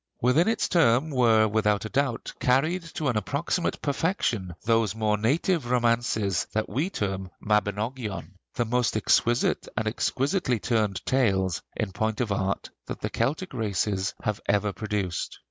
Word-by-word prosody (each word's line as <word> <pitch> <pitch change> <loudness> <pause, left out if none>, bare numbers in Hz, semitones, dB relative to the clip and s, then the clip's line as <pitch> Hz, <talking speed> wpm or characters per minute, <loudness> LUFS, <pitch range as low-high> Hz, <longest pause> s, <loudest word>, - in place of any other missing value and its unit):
Within 130 - +3
its 225 0 +1
term 150 -2 +3
were, 115 -4 +4
without 105 -1 +1
a - - -4
doubt, 135 -2 -1
carried 155 +9 +2
to 155 - -1
an 120 - 0
approximate 145 - -1
perfection 135 - -1
those 115 -2 +2
more 110 -1 +1
native 140 - +1
romances 115 -5 +1
that 110 0 0
we 145 - -1
term 95 - -3
'Mabinogion,' 105 +1 -1 0.2
the 120 - +1
most 120 -1 +1
exquisite 120 +2 +2
and 110 -2 0
exquisitely 130 - 0
turned 105 -4 0
tales, 95 -9 +1
in 110 -3 -2
point 110 +2 -1
of 120 -4 -1
art, 100 0 -1 0.2
that - - -6
the - - -3
Celtic 145 +11 -1
races 100 -2 -1
have 105 -1 -1 0.3
produced. 105 -5 -3
115 Hz, 145 wpm, -26 LUFS, 105-130 Hz, 0.3 s, were